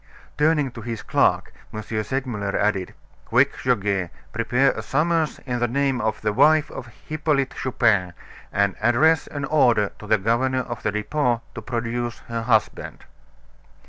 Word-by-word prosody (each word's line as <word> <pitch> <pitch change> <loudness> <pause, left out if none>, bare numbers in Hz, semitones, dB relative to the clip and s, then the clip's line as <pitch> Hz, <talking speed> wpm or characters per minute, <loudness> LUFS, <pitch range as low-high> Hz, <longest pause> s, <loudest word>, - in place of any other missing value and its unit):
Turning 150 -2 +2
to 115 - -9
his 115 -1 -5
clerk, - - +1 0.2
M. 110 - -6
Segmuller 110 -2 -3
added: 100 -3 -1 0.3
"Quick, 130 +4 +3
Goguet, 100 -7 0 0.2
prepare 125 +4 +2
a - - -5
summons 160 +1 0
in 125 -2 -2
the 120 - +1
name 135 0 0
of 110 -1 -2
the 105 -1 0
wife 150 +5 +4
of 120 - -8
Hippolyte 150 +2 -2
Chupin, 105 -8 +1 0.4
and 100 -1 +1
address 130 +8 +3
an 140 -1 -4
order 120 -9 +3
to 105 - -10
the 110 - +4
governor 125 +6 +1
of 120 -2 -6
the - - -1
Depot 120 +3 -1
to - - -7
produce 120 0 -3
her 115 0 -2
husband!" 110 -2 0
120 Hz, 150 wpm, -23 LUFS, 110-135 Hz, 0.4 s, wife